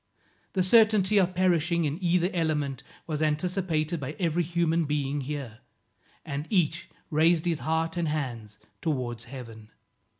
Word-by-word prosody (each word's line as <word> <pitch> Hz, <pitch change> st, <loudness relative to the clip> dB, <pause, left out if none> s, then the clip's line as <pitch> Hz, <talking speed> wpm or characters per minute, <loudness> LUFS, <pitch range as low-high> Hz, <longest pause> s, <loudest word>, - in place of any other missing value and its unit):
The 185 Hz, -, +2 dB
certainty 210 Hz, -1 st, +5 dB
of 185 Hz, -1 st, +1 dB
perishing 170 Hz, -2 st, +2 dB
in 150 Hz, +6 st, -3 dB
either 175 Hz, +1 st, +2 dB
element 150 Hz, -6 st, -1 dB, 0.2 s
was 155 Hz, -2 st, -3 dB
anticipated 160 Hz, 0 st, 0 dB
by 140 Hz, +2 st, -5 dB
every 170 Hz, -1 st, +1 dB
human 170 Hz, -1 st, +1 dB
being 145 Hz, -1 st, -1 dB
here, 135 Hz, -5 st, -5 dB, 0.7 s
and 140 Hz, +3 st, -4 dB
each 175 Hz, -3 st, +1 dB, 0.2 s
raised 160 Hz, +2 st, +3 dB
his 165 Hz, -3 st, 0 dB
heart 160 Hz, +1 st, -1 dB
and 170 Hz, -2 st, 0 dB
hands 120 Hz, -9 st, -4 dB, 0.2 s
towards 125 Hz, -7 st, -2 dB
Heaven. 115 Hz, -4 st, -10 dB
160 Hz, 135 wpm, -27 LUFS, 145-175 Hz, 0.7 s, certainty